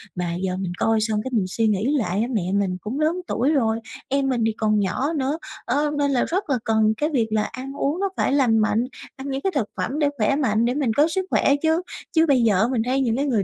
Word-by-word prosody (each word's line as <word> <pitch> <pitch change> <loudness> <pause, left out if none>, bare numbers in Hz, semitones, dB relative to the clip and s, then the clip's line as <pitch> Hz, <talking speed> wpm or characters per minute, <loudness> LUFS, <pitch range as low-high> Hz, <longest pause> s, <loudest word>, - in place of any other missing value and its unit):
mà 175 -1 -2
giờ 185 0 -2
mình 185 -2 -3
coi 225 -1 +2
xong 215 -1 0
cái 260 - -5
mình 210 -5 +2
suy 220 +4 0
nghĩ 215 +8 +1
lại 205 -4 0
á, 235 - 0
mẹ 215 - +1
mình 195 -2 0
cũng 245 +8 -4
lớn 330 +4 +1
tuổi 260 +5 +1
rồi, 225 -7 +1 0.3
em 275 0 0
mình 245 -3 0
thì 225 - +1
còn 215 -1 +2
nhỏ 255 - -1
nữa, 285 +1 -1 0.3
ơ, 290 +4 +1
nên 285 -1 +1
là 255 - +2
rất 370 -1 -2
là 270 - +2
cần 220 -1 +3
cái 300 +2 0
việc 240 -7 +1
là 215 -1 +2
ăn 265 +4 -6
uống 290 +5 -1
nó 395 0 0
phải - - +1
lành 255 -6 +3
mạnh, 215 +2 +2 0.3
ăn 265 +1 -7
những 270 0 -2
cái 385 - 0
thực 225 -7 0
phẩm 285 +5 -2
để 290 -1 +3
khỏe 225 +5 +2
mạnh, 230 -6 +1
để 245 - +1
mình 265 -6 0
có 295 +6 +4
sức 375 +3 -2
khỏe 280 - +3
chứ. 320 +2 +2 0.3
Chứ 320 0 +4
bây 275 -6 +3
giờ 205 -5 +3
á, 220 - +3
mình 240 -4 +1
thấy 265 +2 +1
những 235 -4 +1
cái 280 - 0
người 235 -8 +1
250 Hz, 275 wpm, -23 LUFS, 215-285 Hz, 0.3 s, có